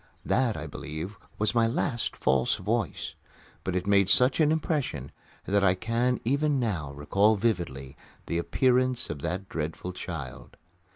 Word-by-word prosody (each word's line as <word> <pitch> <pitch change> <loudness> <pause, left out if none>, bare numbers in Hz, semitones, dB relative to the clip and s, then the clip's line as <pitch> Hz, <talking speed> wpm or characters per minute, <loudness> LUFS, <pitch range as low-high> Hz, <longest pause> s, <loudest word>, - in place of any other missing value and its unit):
That, 125 -5 +2
I 75 - -5
believe, 80 +6 -6 0.2
was 105 +2 +1
my 115 -1 +4
last 120 +1 -1
"false 65 -1 +2
voice," 105 0 -2 0.5
but 95 - -2
it 90 0 0
made 100 -1 +4
such 125 +7 +4
an 155 -1 +5
impression 145 - -1 0.3
that 100 0 +2
I 95 -1 +5
can 115 +5 0
even 140 +3 +2
now 90 - -1
recall 100 +10 +3
vividly 85 - -2 0.3
the 85 - -1
appearance 130 +6 +2
of 75 -2 -6
that 95 +5 -3
dreadful 80 +3 -4
child. 70 -8 -7
100 Hz, 150 wpm, -28 LUFS, 80-120 Hz, 0.5 s, an